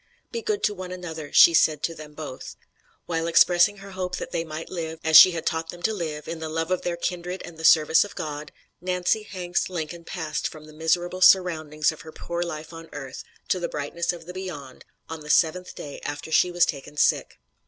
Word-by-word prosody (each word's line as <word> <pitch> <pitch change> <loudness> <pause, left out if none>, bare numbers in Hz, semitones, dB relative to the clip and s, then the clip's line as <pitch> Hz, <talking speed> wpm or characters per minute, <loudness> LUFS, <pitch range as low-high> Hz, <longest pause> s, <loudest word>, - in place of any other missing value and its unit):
"'Be 465 - -3
good 425 -2 -2
to 210 - +2
one 185 -2 -7
another,' 165 -5 -7
she 170 - +8
said 155 -2 +3
to 165 - -1
them 150 -2 -12
both. 150 -4 -8 0.5
While 165 -1 -2
expressing 175 +4 +5
her 195 0 -11
hope 185 -1 -3
that - - -6
they 165 -1 -1
might 160 0 -7
live, 165 -2 -4
as 160 0 +2
she 180 +3 +11
had 165 - -4
taught 160 0 -1
them 175 0 -9
to 220 - +1
live, 155 -6 -5
in 165 - -5
the 160 0 -5
love 165 +2 -2
of 185 - +1
their 175 -1 -2
kindred 180 +1 -4
and 175 - -11
the 160 - -10
service 160 0 +6
of 205 - -10
God, 150 -1 -5 0.3
Nancy 180 +3 0
Hanks 180 -4 -3
Lincoln 170 -1 -5
passed 160 -3 -3
from 155 -1 -11
the 155 - -14
miserable 175 +3 0
surroundings 155 -5 +4
of 155 - -11
her 160 - -11
poor 170 +2 -5
life 160 -1 -5
on 165 0 -10
earth 135 -3 -7 0.3
to 185 - +1
the 170 -1 -3
brightness 150 +4 -2
of 170 -2 -10
the 180 - -8
Beyond, 165 -9 -8 0.2
on 160 0 -6
the 150 0 -11
seventh 165 +4 +2
day 145 - -8
after 145 +2 -5
she 180 - +4
was 175 -1 +3
taken 145 -1 -6
sick." - - +2
165 Hz, 220 wpm, -25 LUFS, 155-180 Hz, 0.5 s, she